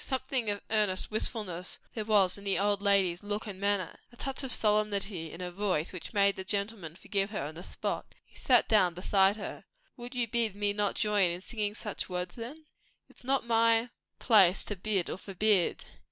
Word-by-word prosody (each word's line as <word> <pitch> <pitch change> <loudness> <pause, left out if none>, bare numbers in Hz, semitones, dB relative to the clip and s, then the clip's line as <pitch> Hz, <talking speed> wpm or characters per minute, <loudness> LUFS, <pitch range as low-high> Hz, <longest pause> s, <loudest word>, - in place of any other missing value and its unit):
Something 260 -3 -1
of 205 -1 -1
earnest 210 -4 +1
wistfulness 210 -5 -2 0.2
there 220 - -3
was 200 -4 +3
in 200 - -7
the 195 -1 0
old 205 0 +1
lady's 195 -4 +2
look 205 +2 -4
and 200 -3 -8
manner, 200 -3 -1
a - - -17
touch 270 +2 -2
of 265 - -3
solemnity 210 -6 +1
in 170 - -9
her 180 0 -4
voice, 185 -4 -1
which 180 - -7
made 200 -2 +3
the 190 - -4
gentleman 200 -4 -3
forgive 195 +2 -2
her 205 -9 -4
on 150 +2 -5
the 170 +3 -9
spot. - - -5
He - - -27
sat 250 -3 +3
down 185 -6 +4
beside 195 +2 +3
her. 215 - -7 0.3
"Would 245 +1 -8
you 240 -1 +1
bid 225 -3 +1
me 205 0 +1
not 205 -1 0
join 210 -4 +3
in 175 +1 -4
singing 210 0 -3
such 210 -3 -4
words, 180 0 -3
then?" 270 +7 -8 0.4
"It's - - -18
not 265 0 +1
my 230 0 +3 0.3
place 195 -5 +5
to 205 - -4
bid 195 -1 -1
or - - -4
forbid. 195 -1 +1
205 Hz, 195 wpm, -30 LUFS, 185-220 Hz, 0.4 s, place